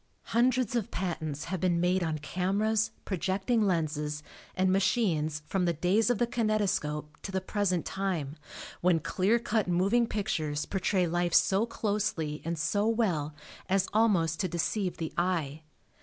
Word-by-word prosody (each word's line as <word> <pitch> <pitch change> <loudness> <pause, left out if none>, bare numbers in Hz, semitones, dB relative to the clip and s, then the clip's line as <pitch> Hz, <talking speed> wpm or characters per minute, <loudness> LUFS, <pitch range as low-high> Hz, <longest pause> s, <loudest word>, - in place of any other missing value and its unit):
Hundreds 245 0 +2
of 230 -4 -1
patents 155 -5 -3
have 185 +1 -3
been 175 -1 +1
made 180 +2 +2
on 160 -2 -1
cameras, 200 +8 0 0.2
projecting 195 +5 0
lenses 150 -5 -1 0.3
and 185 0 +2
machines 185 -7 +1
from 185 +2 0
the 170 - +2
days 185 +8 +2
of 245 - +2
the 240 - +2
kinetoscope 200 -10 -1
to 195 - -6
the 190 - 0
present 185 -2 -1
time 180 -7 -2 0.5
when 175 -2 +3
clear 185 +8 +1
cut 220 -3 0
moving 195 +7 +2
pictures 155 -9 -2
portray 190 -1 +1
life 175 0 0
so 200 +4 +4
closely 200 -9 -2
and 170 +1 -2
so 205 +7 +1
well 180 -11 0 0.3
as 195 0 +2
almost 190 -8 +2
to 185 - +1
deceive 180 +2 -1
the 160 -2 -4
eye. 160 -5 -1
185 Hz, 150 wpm, -29 LUFS, 160-210 Hz, 0.5 s, so